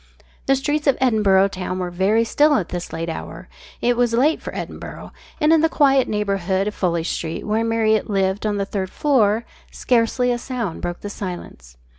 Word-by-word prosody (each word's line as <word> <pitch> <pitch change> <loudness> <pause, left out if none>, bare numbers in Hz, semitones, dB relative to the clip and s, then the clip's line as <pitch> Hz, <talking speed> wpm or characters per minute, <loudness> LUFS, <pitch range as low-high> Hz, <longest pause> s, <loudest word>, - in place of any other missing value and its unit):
The 270 - +4
streets 295 +2 -1
of 275 - +4
Edinburgh 205 -6 +3
town 185 -1 -4
were 180 -1 -3
very 195 +6 +2
still 295 +6 +3
at 185 -10 -1
this 175 -1 -5
late 165 +1 -4
hour 165 - -7 0.3
it 245 0 +2
was 240 -1 +1
late 290 +7 +2
for - - -6
Edinburgh - - -7 0.3
and 305 0 +4
in 320 - +4
the 325 - +3
quiet 275 -4 +3
neighbourhood 195 -2 -1
of 210 - -6
F 170 -2 +1
Street, 165 -1 -3
where 220 +2 0
Marriott 220 -1 +1
lived 195 +1 0
on 205 -1 -1
the 200 - -1
third 195 -2 -3
floor, 230 -6 +2 0.2
scarcely 245 +1 +1
a 240 - -1
sound 235 -8 -4
broke 175 0 -4
the 205 - -5
silence. 175 - -8
210 Hz, 190 wpm, -21 LUFS, 190-250 Hz, 0.3 s, The